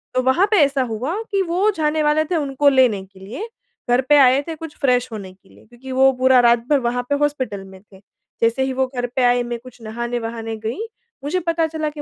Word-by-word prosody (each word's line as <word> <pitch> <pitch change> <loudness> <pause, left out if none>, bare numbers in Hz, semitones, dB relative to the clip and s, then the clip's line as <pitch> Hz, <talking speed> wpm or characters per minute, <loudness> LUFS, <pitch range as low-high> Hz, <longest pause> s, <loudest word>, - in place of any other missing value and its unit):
तो 255 - +3
वहाँ 260 +9 +3
पे 425 - +4
ऐसा 275 -1 -1
हुआ 255 - -3 0.2
कि 395 -1 +1
वो 365 +4 +1
जाने 310 0 0
वाले 300 +1 +2
थे 350 +3 -2
उनको 285 -2 +2
लेने 250 -8 +3
के 190 0 -20
लिए, 235 - -7 0.4
घर 245 +1 +4
पे 295 - +7
आए 265 0 +5
थे 325 - -4
कुछ 320 -1 -9
फ़्रेश 250 -2 +2
होने 195 -4 -8
के 190 +1 -27
लिए - - -20
क्योंकि 245 +3 -12
वो 265 +1 +5
पूरा 260 0 +5
रात 235 0 +3
भर 290 -2 +4
वहाँ 245 0 -2
पे 285 - +2
हॉस्पिटल 260 -9 -2
में 190 0 -14
थे। 195 -1 -19 0.4
जैसे 230 +3 +2
ही 265 0 -2
वो 265 0 +1
घर 245 0 -1
पे 260 - +1
आए 245 0 +3
मैं 240 0 -5
कुछ 245 0 -15
नहाने-वहाने 225 0 -4
गई 225 - -3 0.5
मुझे 365 +6 0
पता 330 -1 +1
चला 310 -1 -3
कि 295 0 -8
260 Hz, 235 wpm, -20 LUFS, 235-295 Hz, 0.5 s, पे